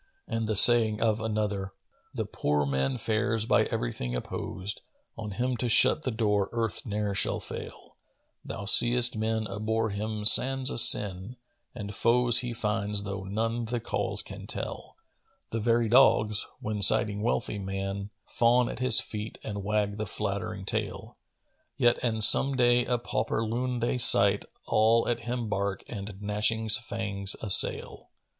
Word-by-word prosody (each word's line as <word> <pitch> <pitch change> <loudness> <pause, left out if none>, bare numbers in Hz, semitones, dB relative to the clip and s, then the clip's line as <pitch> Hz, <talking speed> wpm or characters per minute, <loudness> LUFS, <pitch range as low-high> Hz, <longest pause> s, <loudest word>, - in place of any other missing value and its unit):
And 115 -1 -4
the 110 - -2
saying 110 0 +5
of 110 -1 -1
another, 105 -3 -4 0.4
"The - - -5
poor 75 0 -2
man 65 -1 -2
fares 110 0 -2
by - - +1
everything - - -5
opposed: 95 +10 -6 0.2
* - - -48
On 110 -2 -8
him 125 +5 -3
to 120 +1 -3
shut 115 - +3
the 135 - -4
door 105 -4 -2
Earth 115 -3 -4
ne'er 105 -1 -3
shall - - -2
fail: - - -11 0.5
Thou 100 - -8
seest 120 +3 +6
men 110 0 -3
abhor 110 +2 -3
him 105 +1 -6
sans 135 +4 +6
a - - +5
sin, 100 +2 +5 0.2
* - - -47
And 105 0 -8
foes 120 +2 +2
he 125 -1 -5
finds 105 -3 -3
tho' 100 -1 -7
none 115 +4 -4
the 120 +2 -4
cause - - -3
can - - -11
tell: - - -7 0.6
The 115 - -3
very 115 +1 0
dogs, 110 -3 +2
when 105 -1 -5
sighting 105 +1 +5
wealthy 105 -2 -3
man, 95 +1 -6
* - - -52
Fawn 120 +1 +2
at - - -8
his 130 -3 +7
feet 105 +1 -6
and 100 -2 -7
wag 105 0 -2
the 110 -1 -5
flattering 100 -1 -6
tail; - - -6 0.6
Yet, 120 0 +1
an 110 -3 -2
some 135 +5 +6
day 120 -1 +2
a 125 - -1
pauper 115 -1 -4
loon 120 +2 -4
they 120 +2 -2
sight, 100 -4 +5
* - - -48
All 110 +2 +1
at 120 - -2
him 120 -2 -4
bark 100 -1 -4
and, 100 -2 -9
gnashing 105 +2 -2
fangs, 105 -3 -2
assail." 100 -3 +2
110 Hz, 165 wpm, -26 LUFS, 100-115 Hz, 0.6 s, his